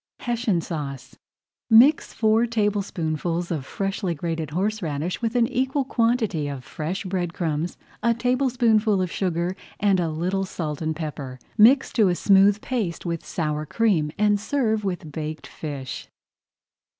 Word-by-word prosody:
HESSIAN 235 -7 0
SAUCE 145 -6 -6 0.5
Mix 250 +7 +6
four 220 +1 +2
tablespoonfuls 180 -6 -1
of 145 -6 -3
freshly 195 -2 -2
grated 165 -1 -3
horseradish 180 -2 -2
with 230 +1 -1
an 240 -1 +4
equal 265 +3 0
quantity 230 - +1
of 140 -3 -5
fresh 180 +10 -4
bread 180 -2 -2
crumbs, 165 0 -2 0.2
a 235 0 +2
tablespoonful 235 -4 +2
of 180 -2 -1
sugar, 180 -1 -1 0.2
and 200 -2 +3
a 170 -2 0
little 180 +5 -1
salt 155 -5 -4
and 160 0 -1
pepper. 145 -5 -5 0.2
Mix 245 +6 +5
to 215 -4 +4
a 175 - +1
smooth 200 +2 +4
paste 215 -11 -3
with 170 -2 -3
sour 150 -2 -2
cream 165 -3 +1
and 210 0 +3
serve 220 -2 0
with 175 -5 -4
baked 155 -1 -5
fish. 140 -4 -6
185 Hz, 140 wpm, -24 LUFS, 160-220 Hz, 0.5 s, Mix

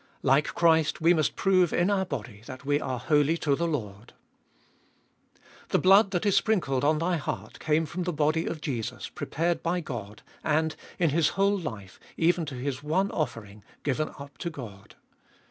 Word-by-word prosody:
Like 140 +2 +2
Christ 160 -2 +3
we 165 +2 +5
must 155 -4 +1
prove 185 -3 +3
in 175 +4 +2
our 190 -2 +1
body 115 - -6
that 130 +1 -9
we 145 +1 +1
are 130 -1 -2
holy 145 +5 +2
to 145 -4 +1
the 170 +3 -1
Lord. 110 -8 -5 1.6
The - - +3
blood 195 +2 +6
that 185 0 -1
is 200 - +3
sprinkled 170 - +1
on 155 +2 +3
thy 170 +2 0
heart 150 - -5
came 155 +1 +1
from 170 +4 -5
the 180 0 -1
body 155 +1 +1
of 155 - -4
Jesus, 120 -7 -4
prepared 165 +1 -2
by 175 +2 0
God, 115 - -7 0.2
and, 155 +1 +1 0.2
in 165 -4 +2
His 160 0 +3
whole 200 +1 +3
life, 110 - -7 0.2
even 170 -1 +2
to 140 - -5
His 130 +1 -3
one 185 +7 0
offering, 105 -9 -4 0.2
given 150 +2 0
up 140 -3 -11
to 170 - -3
God. 110 -9 -10
155 Hz, 180 wpm, -27 LUFS, 130-170 Hz, 1.6 s, blood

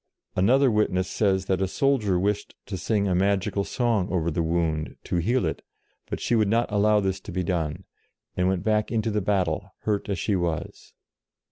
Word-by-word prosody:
Another 130 +8 +4
witness 95 -4 +1
says 95 -2 +1
that 95 0 0
a 95 - +2
soldier 110 -4 +1
wished 100 +3 -1
to 100 - -5
sing 100 +3 0
a 95 - +1
magical 100 +1 +1
song 115 -5 0
over 85 -2 0
the 80 - -1
wound, 80 -2 -1
to - - -2
heal 120 +9 +1
it, - - -3 0.5
but - - -3
she - - -1
would 110 -3 +3
not 115 +2 +1
allow 105 +1 +3
this 95 -1 -1
to - - -9
be 90 +1 -1
done, 80 -4 -2 0.5
and 90 0 +1
went 95 -2 0
back 110 0 +1
into 115 -1 0
the 105 0 0
battle, 95 -1 -1
hurt 105 -1 -1
as 100 - -1
she 100 +4 0
was. 85 -3 -3
95 Hz, 195 wpm, -25 LUFS, 90-105 Hz, 0.5 s, Another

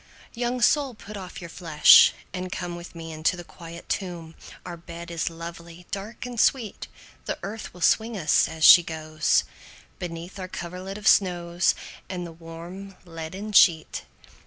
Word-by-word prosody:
II. 235 - -7
Young 245 +1 -1
soul 280 -3 +3
put 210 0 -10
off 195 +1 -8
your 170 - -8
flesh, 160 -4 +7 0.2
and 185 0 -5
come 175 -1 -4
With 175 0 -10
me 165 -1 -7
into 155 +3 0
the 175 - -7
quiet 170 0 -11
tomb, 170 -4 -4 0.3
Our 175 -1 -6
bed 170 0 -10
is 170 0 -1
lovely, 170 +1 -10
dark, 205 +5 -6
and 245 -2 -6
sweet; 235 -5 +1 0.4
The - - -3
earth 210 +2 -6
will 180 - -14
swing 220 +5 +2
us, 155 -5 +3
as 160 -1 -6
she 175 - +10
goes, 155 -2 0 0.6
Beneath 175 +2 -7
our 185 - -5
coverlid 185 +2 -7
of 210 - -4
snows, 175 -2 +3 0.3
And 180 -2 -4
the 170 - -8
warm 170 +4 -10
leaden 175 +5 -7
sheet. 165 -5 +4
175 Hz, 165 wpm, -25 LUFS, 165-195 Hz, 0.6 s, she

